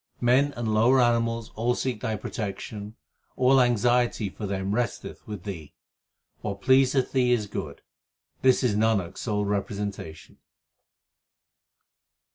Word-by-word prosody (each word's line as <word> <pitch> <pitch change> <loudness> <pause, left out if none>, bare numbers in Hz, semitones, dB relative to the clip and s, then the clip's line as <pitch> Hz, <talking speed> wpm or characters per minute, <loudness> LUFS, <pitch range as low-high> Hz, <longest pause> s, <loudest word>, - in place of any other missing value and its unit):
Men 130 +4 +3
and 115 -2 -2
lower 120 +5 +4
animals 115 -2 +1
all 120 +2 0
seek 125 -5 -3
Thy 110 -3 -1
protection; 105 +1 -6 0.4
all 130 +1 +4
anxiety 120 -2 +2
for 105 +2 -6
them 95 0 -2
resteth 120 +1 -3
with 105 -5 -7
Thee. 85 -7 -8 0.7
What 100 -1 -5
pleaseth 130 0 +3
Thee 125 -2 +2
is 115 -4 +2
good; 100 - -6 0.6
this 130 0 +4
is 115 -5 +2
Nanak 105 -5 +1
s - - -11
sole 105 -3 -1
repre 100 0 -1
sentation. 100 -6 -6
110 Hz, 130 wpm, -26 LUFS, 100-125 Hz, 0.7 s, lower